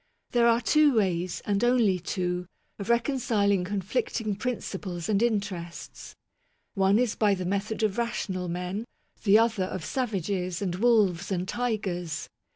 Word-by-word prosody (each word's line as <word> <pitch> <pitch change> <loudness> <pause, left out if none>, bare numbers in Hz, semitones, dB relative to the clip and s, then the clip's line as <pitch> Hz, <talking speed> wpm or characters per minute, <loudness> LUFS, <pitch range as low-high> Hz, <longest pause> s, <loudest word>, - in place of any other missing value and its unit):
There 235 -1 +4
are 235 0 +4
two 300 -2 +4
ways, 180 -4 0
and 205 +1 0
only 235 -7 +3
two, 180 0 -2 0.3
of 200 +2 -5
reconciling 230 -6 +2
conflicting 205 +3 -2
principles 195 -6 -4
and 210 -1 +2
interests. 200 -7 -3 0.6
One 195 +1 +3
is 245 -2 +2
by 205 -2 +2
the 185 -1 -4
method 200 +4 -2
of 215 +1 +1
rational 190 -6 -2
men; 180 +5 -3 0.4
the 205 -1 +6
other, 225 -4 +2
of 185 -3 -5
savages 195 - -2
and 190 -4 -2
wolves 200 -3 +2
and 185 -1 -1
tigers. 190 -9 -2
200 Hz, 140 wpm, -27 LUFS, 180-230 Hz, 0.6 s, the